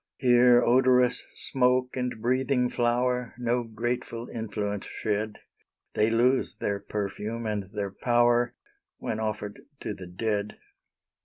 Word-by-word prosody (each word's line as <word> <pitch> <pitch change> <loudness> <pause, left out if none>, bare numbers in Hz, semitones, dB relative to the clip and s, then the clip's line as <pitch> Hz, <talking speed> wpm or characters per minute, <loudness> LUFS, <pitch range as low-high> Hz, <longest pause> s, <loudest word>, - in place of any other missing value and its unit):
Here 120 -1 +5
odorous 125 0 +4
smoke 125 -1 +1
and 125 -3 -2
breathing 125 +1 +1
flowerNo 120 -1 0
grateful 120 0 -3
influence 105 -3 -3
shed; 105 0 -2 0.6
They 110 - +3
lose 125 +3 +2
their 100 -1 -2
perfume 105 +3 -4
and 105 -3 -2
their 100 -2 -3
power, 120 +2 +2 0.4
When 110 - -3
offered 105 -1 -4 0.2
to 105 - -3
the 95 -3 -9
dead. 105 +3 -2
120 Hz, 110 wpm, -27 LUFS, 105-125 Hz, 0.6 s, Here